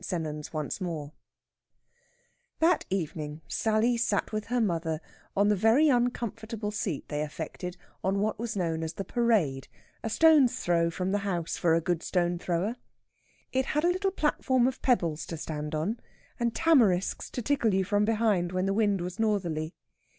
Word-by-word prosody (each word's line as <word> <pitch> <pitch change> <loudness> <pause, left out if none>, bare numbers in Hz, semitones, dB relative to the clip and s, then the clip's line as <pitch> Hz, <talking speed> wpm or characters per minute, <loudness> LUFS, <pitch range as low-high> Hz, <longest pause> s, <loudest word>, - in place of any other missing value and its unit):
SENNANS 155 -4 -4
ONCE 155 +4 -3
MORE 155 -5 -4 1.4
That 330 +1 +3
evening 155 -4 -3
Sally 225 +2 +1
sat 215 -4 0
with 215 -1 -2
her 245 +1 0
mother 165 -7 0 0.4
on 205 +1 +4
the 210 - +4
very 225 +10 +4
uncomfortable 230 -3 -1
seat 210 - -3
they 150 0 -2
affected 165 +4 -5 0.3
on 195 +1 +1
what 215 +1 -1
was 230 -2 -3
known 165 -3 -1
as 160 0 -3
the 195 - -5
Parade, 200 - +1 0.4
a 225 - -1
stone's 300 -1 +5
throw 170 -1 +2
from 180 +3 -2
the 205 - +1
house 180 -5 -2
for 165 -2 +3
a 165 - +2
good 170 0 -1
stone 175 -1 0
thrower. 180 +8 -1 0.7
It 260 0 0
had 300 +1 0
a 345 - +4
little 380 +2 0
platform 265 -8 +1
of 260 0 -3
pebbles 170 - +1
to 165 - -5
stand 150 0 -4
on, 200 +10 -1 0.4
and 235 -1 0
tamarisks 235 - +3
to 245 - -5
tickle 235 -6 +2
you 190 - +2
from 205 +2 +1
behind 210 -5 +1
when 185 +1 0
the 195 - +1
wind 205 -3 +2
was 180 +2 -5
northerly. 175 -7 0
195 Hz, 170 wpm, -28 LUFS, 170-230 Hz, 1.4 s, stone's